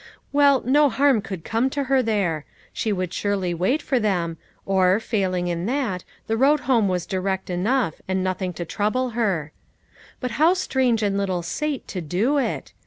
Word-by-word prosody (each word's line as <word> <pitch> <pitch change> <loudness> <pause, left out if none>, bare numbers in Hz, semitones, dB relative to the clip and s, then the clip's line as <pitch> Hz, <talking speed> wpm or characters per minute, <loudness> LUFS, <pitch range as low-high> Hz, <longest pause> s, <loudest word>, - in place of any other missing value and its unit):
"Well, 285 -2 +4
no 290 +3 +4
harm 270 -3 +3
could 190 -5 -7
come 230 +8 0
to 280 +1 -2
her 265 0 +2
there; 195 - 0 0.3
she 220 - -1
would 185 -2 -2
surely 195 -4 -1
wait 190 - 0
for 260 - +1
them, 175 -6 0 0.3
or, 190 0 +3
failing 190 -5 -1
in 175 +2 -2
that, 235 -9 -1 0.2
the 225 - 0
road 280 +5 +3
home 240 -6 +2
was 180 -2 -1
direct 190 -1 -2
enough, 195 - 0
and 190 0 0
nothing 185 0 -2
to 175 +1 -5
trouble 225 +8 -1
her; 195 -10 -1 0.7
but 250 -2 -3
how 340 +4 +6
strange 255 - +1
in 200 -1 +1
little 185 -3 -1
Sate 280 - -3
to 185 - -4
do 205 - +1
it 270 - -3
205 Hz, 175 wpm, -23 LUFS, 185-260 Hz, 0.7 s, how